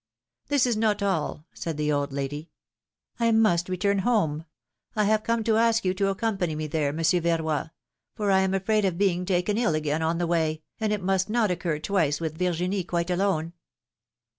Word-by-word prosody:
^^This 285 -3 +3
is 240 -2 +1
not 215 -2 +1
all,^' 160 -5 -1
said 165 -3 -5
the 150 0 0
old 145 -1 0
lady, 140 +3 -4 0.7
must 220 -7 +3
return 200 +2 +1
home. 175 -8 +1 0.5
I 215 - +2
have 215 +1 +2
come 230 0 0
to 220 0 +2
ask 230 -1 +2
you 185 - +2
to 195 +1 0
accompany 195 -5 -1
me 155 0 -3
there. 150 -1 -1
Monsieur 165 +3 +1
Verroy, 160 -2 0 0.5
for 205 -2 0
I 190 - +5
am 190 0 +1
afraid 210 +2 +1
of 185 -3 0
being 180 -2 +1
taken 195 +3 +1
ill 200 -10 +2
again 155 0 -1
on 165 +1 0
the 175 - 0
way, 160 -2 0 0.2
and 215 -1 0
it 210 -3 -1
must 190 +1 +1
not 220 -3 +2
occur 175 -3 -1
twice 155 -3 0
with 160 -1 -4
Virginie 180 +2 0
quite 170 0 -2
alone. 175 -3 0
180 Hz, 190 wpm, -26 LUFS, 160-205 Hz, 0.7 s, I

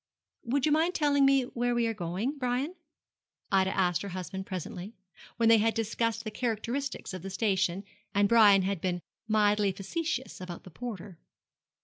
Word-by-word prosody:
'Would 265 +4 0
you 305 - +2
mind 325 +4 +2
telling 285 -2 +3
me 275 -1 +4
where 245 -1 -1
we 240 -1 +2
are 225 - 0
going, 200 - -3
Brian?' 255 +6 -1 0.8
Ida 190 -1 +3
asked 175 -4 +2
her 200 - -5
husband 185 +1 -6
presently, 190 +3 -6 0.4
when 230 0 +3
they 225 -1 +7
had 225 +1 +2
discussed 225 0 -1
the 215 - -5
characteristics 240 +3 -3
of 185 - -6
the 195 - -6
station, 190 -2 0 0.3
and 200 0 +3
Brian 205 -4 +6
had 190 -2 -2
been 180 -2 -2 0.2
mildly 210 -2 +3
facetious 265 - -4
about 180 -2 -7
the 185 - -12
porter. 200 -4 -7
215 Hz, 165 wpm, -29 LUFS, 190-245 Hz, 0.8 s, they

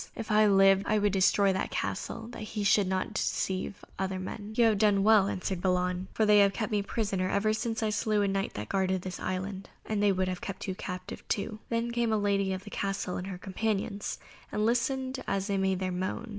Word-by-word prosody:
If 220 -1 -5
I 215 0 +5
lived, 195 0 +5
I 215 - +3
would 205 -1 +2
destroy 195 +1 +4
that 190 - -2
castle 225 - -3
that 240 - -9
he 215 0 -4
should 200 -1 +4
not 190 +3 -1
deceive 190 -1 -2
other 190 -1 -1
men." 205 +3 -6
"You 240 - +5
would 225 - +6
have 215 - +1
done 205 -2 +4
well," 210 -2 +6
answered 185 -2 -3
Balan, 180 0 0
"for 220 - +1
they 210 0 +6
have 200 -1 +5
kept 220 +3 -3
me 210 -1 +2
prisoner 200 -3 -1
ever 215 +2 +2
since 225 0 -2
I 215 - +1
slew 210 0 +1
a - - +2
Knight 195 0 -1
that 105 +1 -5
guarded 190 - 0
this 185 -1 -5
island, 190 +1 -4 0.2
and 215 -2 -1
they 205 -1 +4
would 185 -1 0
have 185 -1 -3
kept 195 0 -6
you 190 - -1
captive 185 -1 -7
too." 215 +1 -2
Then 230 0 -1
came 235 -1 0
the 220 - +2
lady 200 -1 +1
of 185 0 -4
the 205 - -10
castle 195 -2 -2
and 180 - -5
her 190 -2 -5
companions, 200 +1 -2 0.3
and 210 0 0
listened 260 +3 0
as 195 -1 0
they 200 -1 -1
made 190 -1 +1
their 185 0 -2
moan. 185 +6 -3
200 Hz, 230 wpm, -29 LUFS, 190-215 Hz, 0.3 s, would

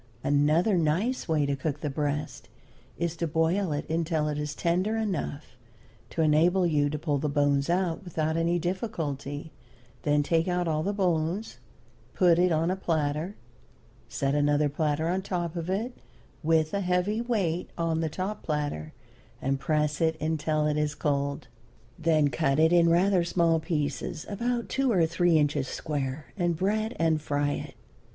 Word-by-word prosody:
Another 155 +7 +3
nice 180 +12 0
way 155 -3 +2
to 140 0 0
cook 145 +2 -3
the 150 - -2
breast 145 +1 -3 0.5
is 170 0 -1
to 170 - -1
boil 165 +4 +1
it 145 0 -3
until 160 -1 0
it 150 0 -2
is 150 0 -3
tender 185 +8 0
enough 175 -10 -3 0.5
to 165 - 0
enable 170 +5 +4
you 145 -3 +2
to 150 - -3
pull 145 -2 -1
the 150 +2 -1
bones 145 0 +1
out 175 0 0
without 160 -3 -1
any 165 +1 +1
difficulty; 160 - -3 0.5
then 145 -1 +2
take 165 +3 +1
out 180 -1 0
all 155 -1 0
the 195 - 0
bones, 180 0 -1 0.6
put 175 -2 +4
it 180 0 +4
on 165 +2 +2
a - - 0
platter, 160 +1 -1 0.7
set 135 0 -1
another 145 0 +2
platter 150 +1 0
on 185 +2 0
top 175 -3 -3
of 170 0 -4
it 225 +6 -2 0.5
with 160 -1 +2
a 200 - 0
heavy 180 +4 +1
weight 195 -8 -1
on 165 -1 0
the 160 - 0
top 190 +6 -4
platter, 145 - -3 0.5
and 135 +1 -1
press 150 0 0
it 160 -1 +1
until 155 -1 0
it 150 0 +1
is 150 0 0
cold. 140 -2 -1 0.5
Then 155 -2 +3
cut 135 +3 +1
it 160 +2 +4
in 170 -1 +5
rather 180 +2 +3
small 170 -1 +2
pieces, 150 -2 -3
about 235 +3 -2
two 270 -1 +1
or 180 -6 +4
three 170 0 +3
inches 145 -2 +1
square, 145 0 -4
and 175 -4 0
bread 215 +5 0
and 160 -2 +2
fry 145 -1 0
it. - - -5
160 Hz, 165 wpm, -27 LUFS, 150-180 Hz, 0.7 s, in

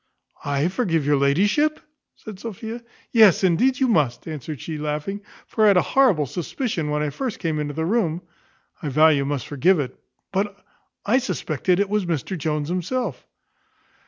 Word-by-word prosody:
"I 145 +2 +1
forgive 180 - 0
your 145 0 +3
ladyship!" 205 - +2 0.4
said 215 -4 -10
Sophia. 225 +2 -6 0.3
"Yes, 215 -6 +6
indeed 215 +9 +3
you 265 - +3
must," 150 - +1
answered 155 -2 -6
she, 155 -2 -5
laughing; 150 +7 -3 0.2
"for 220 - -1
I - - +7
had 200 -3 +5
a - - +4
horrible 230 - +3
suspicion 175 - -3
when 150 0 0
I 150 - -2
first 245 - -4
came 160 -4 -2
into 145 -1 -3
the 160 0 -1
room 180 -4 0 0.6
I 150 - -3
vow 155 +4 +5
you 140 -3 +2
must 140 -1 -2
forgive 160 +5 +2
it; 135 -3 -3 0.4
but 200 +1 -1 0.5
I 240 +6 +3
suspected 180 - -1
it 200 - +2
was 205 -2 -1
Mr 170 +3 -2
Jones 150 -2 -2
himself." 185 - -3
175 Hz, 170 wpm, -23 LUFS, 150-210 Hz, 0.6 s, I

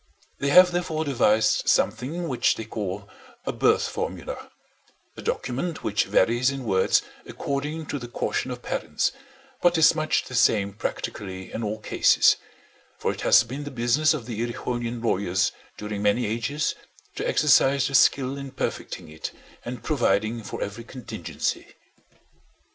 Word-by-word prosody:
They 140 - 0
have 180 +4 +8
therefore 165 -3 -1
devised 110 -5 +2
something 165 +8 +1
which 130 -5 +2
they 110 - -6
call 100 -2 -5 0.4
a - - 0
birth - - +3
formula—a - - -8
document 140 +7 -3
which 105 0 +1
varies 120 +6 +3
in 135 -1 -4
words 95 -3 +3 0.2
according 150 +3 -3
to 145 - -4
the 120 - -7
caution 120 +2 -2
of 125 -1 -6
parents, - - -1 0.5
but 175 -1 +4
is 160 - +6
much 155 -1 0
the - - -10
same 105 -5 +3
practically 95 -3 -5
in 115 - -3
all 105 0 -2
cases; 105 - +4 0.6
for - - 0
it - - -7
has - - +6
been 130 +5 -6
the 145 - -5
business 130 +5 +2
of 130 -7 -6
the 115 -3 -5
Erewhonian 120 0 -3
lawyers 100 -1 +1 0.3
during 105 -1 -4
many 105 +4 +2
ages 120 +8 -1 0.4
to - - -2
exercise 140 -2 +4
their 140 - -6
skill 135 0 +4
in 140 0 -6
perfecting 85 - -4
it 80 0 -6 0.3
and 120 0 -6
providing 115 -5 +1
for - - -5
every 105 +3 -6
contingency. 115 -7 -5
120 Hz, 150 wpm, -25 LUFS, 110-140 Hz, 0.6 s, have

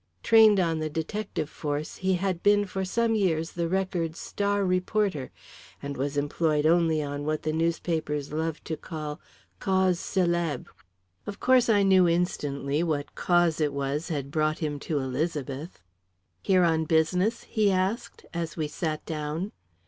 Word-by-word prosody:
Trained 220 -3 +6
on 165 -3 +1
the 155 0 -2
detective 160 +1 -3
force, 150 0 -4
he 190 0 +1
had 185 -1 -1
been 205 0 +4
for 190 0 -3
some 230 +4 +1
years 170 -6 +1
the 170 -1 -2
Record's 175 -3 -1
star 205 0 -1
reporter, 185 -4 0 0.5
and 140 0 -5
was 140 +2 -2
employed 150 +1 +1
only 160 -2 +3
on 145 0 -4
what 155 +1 -2
the 155 - -1
newspapers 160 -3 -1
love 160 0 -2
to 160 - -3
call 155 -1 -6 0.4
causes 190 -2 +2
célèbres. 170 -7 0 0.6
Of 200 0 -6
course, 255 -2 +4
I 205 -2 +4
knew 190 -2 +5
instantly 145 -4 0
what 155 -4 -2
"cause" 175 -3 +2
it 150 -2 +1
was 140 +3 -2
had 140 -5 -3
brought 155 0 +1
him 150 -3 -3
to 155 - +1
Elizabeth. 140 +2 -3 0.6
"Here 185 -2 +3
on 160 -1 +2
business?" 180 +8 +1
he 215 -3 +1
asked, 190 +5 -2
as 165 -2 -4
we 155 -2 -1
sat 155 +1 -3
down. 155 +5 -3
165 Hz, 155 wpm, -27 LUFS, 150-190 Hz, 0.6 s, Trained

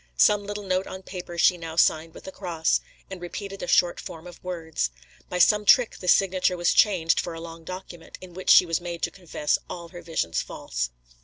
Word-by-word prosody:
Some 205 - +4
little 205 0 -5
note 185 0 -1
on 190 0 -8
paper 175 -2 -8
she 175 +1 +4
now 165 -1 -6
signed 165 0 +2
with - - -12
a 190 - -6
cross, 170 -5 0 0.3
and 190 -2 -7
repeated 195 +3 -6
a - - -4
short 175 -1 +3
form 160 +1 -9
of 175 -1 -12
words. 165 - -2 0.4
By 180 - -2
some 210 +4 +5
trick 240 +3 +4
this 180 - +3
signature 185 -1 +2
was 175 0 +2
changed 180 -6 +3
for 170 - -3
a - - -7
long 165 0 -9
document, 185 -1 -9
in 185 -1 -12
which 185 +1 -5
she - - +8
was 165 +1 -1
made 170 -1 -6
to - - 0
confess 175 -5 -1
all 170 -1 -7
her 175 0 -10
visions 160 - -1
false. - - -4
175 Hz, 215 wpm, -25 LUFS, 165-185 Hz, 0.4 s, she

